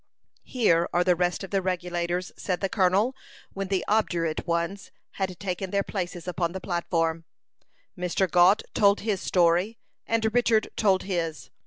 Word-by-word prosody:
"Here 175 -9 +2
are 175 - +3
the 180 0 +3
rest 180 +2 -1
of 190 - -8
the 195 -1 +1
Regulators," 180 -1 -2
said 180 -2 -2
the 195 - -1
colonel, 200 +6 +2 0.4
when 195 0 -4
the 190 -1 -1
obdurate 175 -7 0
ones 170 +4 -2 0.3
had 185 -3 -2
taken 190 -1 -3
their 200 +1 0
places 180 -3 -5
upon 175 -1 -1
the 190 - -4
platform. 165 -3 -1 0.7
Mr. 180 +1 0
Gault 180 +4 +5
told 200 -1 +3
his 205 -3 -1
story, 180 +5 +2 0.3
and 225 -1 +1
Richard 235 -2 +2
told 195 -3 +2
his. 170 -5 -3
185 Hz, 155 wpm, -26 LUFS, 175-200 Hz, 0.7 s, Gault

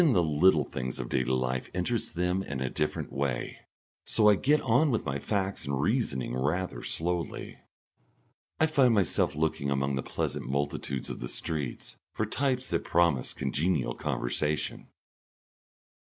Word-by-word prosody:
Even 160 -7 +5
the 90 - +4
little 80 +1 +4
things 65 -1 -4
of - - -5
daily 65 - +1
life 65 0 -1
interest 105 +5 -1
them 90 +2 +1
in 70 -7 -4
a 65 -1 -2
different 75 - -2
way. 70 -3 -2 0.5
So 105 -2 +4
I - - +7
get 145 +10 +3
on 130 +5 +3
with 115 -5 0
my 70 0 -2
facts 100 -2 -2
and 70 -1 -1
reasoning 75 - 0
rather 75 +9 -1
slowly. 85 0 -3 1.0
I 160 - +5
find 135 -7 +4
myself 95 -7 +2
looking 75 -2 0
among 70 0 0
the 65 - 0
pleasant - - -3
multitudes 70 -1 -2
of - - -6
the - - -4
streets 75 -5 -4 0.2
for - - 0
types 130 -2 0
that 85 - +1
promise 85 -7 +2
congenial 75 -6 0
conversation. 75 +7 -2
80 Hz, 155 wpm, -29 LUFS, 70-100 Hz, 1.0 s, I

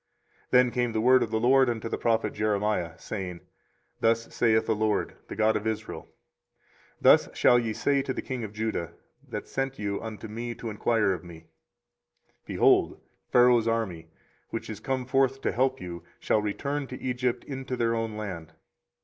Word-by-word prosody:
24:037:006 - - -45
Then 125 -1 +5
came 120 0 0
the 110 - 0
word 130 +2 +6
of - - 0
the 110 0 0
LORD 130 +2 +5
unto 115 -1 -3
the - - -2
prophet 115 -1 +1
Jeremiah 105 -5 0
saying, 95 -4 -5
24:037:007 - - -19 0.6
Thus 115 0 +1
saith 110 -2 +3
the 110 - +1
LORD, 105 0 0
the - - -7
God 110 0 +3
of 105 +1 -1
Israel; 110 0 -4 0.9
Thus - - +6
shall 120 - +5
ye 115 -2 -2
say 140 +4 +1
to 135 - -3
the - - -3
king 130 -3 -4
of 105 - -5
Judah, 105 -6 -3 0.4
that - - -5
sent 135 0 -3
you 100 -1 -3
unto 110 -1 -7
me 115 +2 -5
to 115 -1 -6
enquire 105 -1 +1
of 90 - -6
me; 85 -2 -12 1.0
Behold, - - +3 0.3
Pharaoh's 120 -2 +5
army, 100 -8 -1 0.4
which - - -5
is - - -7
come 130 -1 -2
forth 135 +1 +2
to - - 0
help 130 +2 +1
you, 85 -1 -7 0.2
shall 105 - +1
return 140 +7 -2
to 130 - -8
Egypt 125 -1 -1
into 135 -2 -5
their 115 -1 +1
own 115 -2 -2
land. 90 -7 -6
115 Hz, 185 wpm, -27 LUFS, 105-125 Hz, 1.0 s, word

